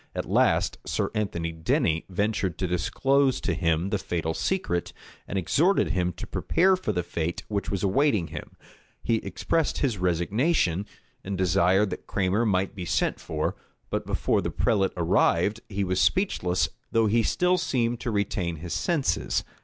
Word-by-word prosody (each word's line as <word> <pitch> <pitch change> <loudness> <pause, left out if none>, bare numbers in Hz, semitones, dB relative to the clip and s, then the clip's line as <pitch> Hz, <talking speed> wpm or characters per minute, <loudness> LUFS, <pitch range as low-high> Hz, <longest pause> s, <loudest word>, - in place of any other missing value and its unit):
At - - -2
last, - - +2
Sir - - -1
Anthony 85 -6 -2
Denny 85 - 0
ventured 95 -2 -1
to 95 - -1
disclose 135 - +1
to - - 0
him 85 +2 0
the 105 - 0
fatal 80 -3 -2
secret, 90 - -1 0.3
and 100 - -3
exhorted 165 - +2
him 90 -1 0
to - - -7
prepare 185 +3 +2
for 185 -12 -2
the 90 -3 -1
fate 85 0 -3
which 100 -2 -2
was 100 -1 -2
awaiting 100 - +2
him. - - -8 0.5
He 115 -1 +2
expressed 160 +7 -1
his 120 -9 0
resignation, 90 - +1 0.4
and 95 0 -4
desired 95 +2 +3
that - - -7
Cranmer 100 +4 +1
might 95 -1 +1
be 95 - -6
sent 85 - 0
for; - - -2 0.4
but - - -2
before - - +1
the - - -2
prelate 95 -3 +1
arrived, 90 +4 +2
he 100 -1 -1
was 95 0 0
speechless, 90 - +1 0.2
though 115 0 +3
he 115 +2 +3
still 180 +10 +2
seemed 120 -8 0
to 120 - -3
retain 100 -5 -1
his 85 +2 -6
senses. 135 - 0
100 Hz, 160 wpm, -26 LUFS, 90-120 Hz, 0.5 s, desired